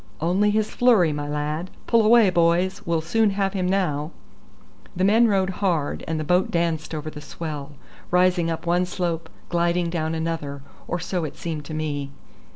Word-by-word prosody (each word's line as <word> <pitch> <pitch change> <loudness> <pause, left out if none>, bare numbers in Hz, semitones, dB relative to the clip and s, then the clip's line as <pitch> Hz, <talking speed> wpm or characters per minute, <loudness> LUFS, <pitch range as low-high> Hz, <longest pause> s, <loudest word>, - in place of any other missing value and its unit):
"Only 185 +6 +2
his 215 0 +1
flurry, 215 -11 +4
my 145 0 -4
lad. 150 +4 -3 0.2
Pull 230 -1 +4
away, 220 -2 +6
boys; 175 +2 +2
we'll 165 -1 +1
soon 215 +7 +2
have 195 -1 +1
him 185 -2 -1
now." 160 -6 0 0.9
The 185 - 0
men 220 +4 +5
rowed 190 -3 +1
hard, 170 -7 0
and 160 -1 -1
the - - -2
boat 180 +4 +2
danced 165 -2 -1
over 155 0 -5
the 150 - -9
swell, 150 -1 -6 0.4
rising 180 -1 +3
up 165 +1 -4
one 175 +1 +2
slope, 170 -3 -3 0.2
gliding 170 0 +1
down 160 -1 -1
another, 160 -4 -3 0.2
or 175 - -2
so 175 0 -2
it 150 -2 -5
seemed 155 -3 -5
to 155 - -6
me. 145 -3 -3
170 Hz, 175 wpm, -23 LUFS, 155-185 Hz, 0.9 s, away